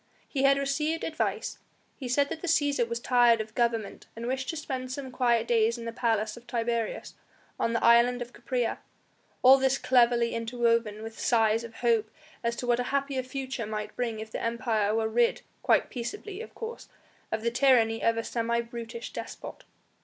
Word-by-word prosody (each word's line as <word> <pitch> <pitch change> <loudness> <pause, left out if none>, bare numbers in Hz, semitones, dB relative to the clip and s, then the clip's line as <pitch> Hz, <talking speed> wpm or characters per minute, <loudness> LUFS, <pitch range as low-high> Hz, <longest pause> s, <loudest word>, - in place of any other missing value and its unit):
He 275 - -2
had 275 0 +5
received 300 +4 -1
advice, 315 - -2 0.4
he 260 - -6
said 280 +3 +2
that 320 -1 -5
the 355 - -4
Cæsar 290 -7 +2
was 235 0 -2
tired 240 -2 +4
of 220 0 -5
government 230 -3 -1
and 230 +1 -6
wished 260 +1 -2
to 325 - -3
spend 260 -4 -4
some 265 -1 -5
quiet 235 -2 +2
days 230 0 +2
in 230 - -7
the 230 - -3
Palace 220 -2 0
of 240 +1 -14
Tiberius, 235 -1 -2 0.5
on 230 - +1
the 230 - 0
island 235 +1 +5
of 245 0 -7
Capraea; 245 -1 -2 0.6
all 265 +1 +8
this 265 0 +2
cleverly 240 -2 +3
interwoven 230 -2 0
with 225 0 -8
sighs 225 -1 +2
of 230 -1 -10
hope 225 -2 +3 0.3
as 235 0 0
to 245 - -5
what 240 0 +2
a - - +1
happier 275 -1 0
future 260 -3 -5
might 215 0 -5
bring 230 -3 -2
if 220 0 -7
the - - -4
Empire 225 -3 0
were 225 0 +1
rid 235 +1 +1 0.2
quite - - +2
peaceably, 390 - -5
of - - -10
course 460 +1 -7 0.4
of 220 0 -2
the 235 - +1
tyranny 235 -3 +3
of 230 0 +2
a 230 - -1
semi 235 0 -1
brutish 235 0 -6
despot. - - -8
235 Hz, 190 wpm, -28 LUFS, 230-260 Hz, 0.6 s, all